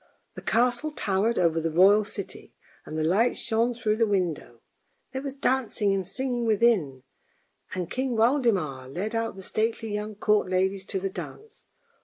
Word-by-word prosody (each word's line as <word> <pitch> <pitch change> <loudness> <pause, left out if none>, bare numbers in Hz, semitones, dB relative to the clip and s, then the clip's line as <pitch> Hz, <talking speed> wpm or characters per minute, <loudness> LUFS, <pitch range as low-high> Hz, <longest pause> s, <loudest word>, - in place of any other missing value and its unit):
The - - -9
castle 245 +6 +1
towered 210 0 0
over 165 -2 +2
the 165 - -1
royal 195 +6 +5
city, 200 -2 -8 0.3
and 155 - -5
the 155 - 0
lights 200 +9 +2
shone 235 +2 +1
through 220 -2 0
the 225 -1 +3
windows; 175 - -1 0.5
there 265 - -4
was 275 -1 -5
dancing 255 -7 +1
and 190 -2 -2
singing 250 +1 -2
within, 200 - +2 0.7
and 180 -2 -2
King 255 +4 -2
Waldemar 220 - +1
led 195 - -4
out 225 -2 -1
the 190 - -9
stately 220 +1 -1
young 210 +1 -4
court 210 -2 +2
ladies 190 +1 0
to 195 - -3
the 195 0 -3
dance. 440 - -9
210 Hz, 165 wpm, -26 LUFS, 185-235 Hz, 0.7 s, royal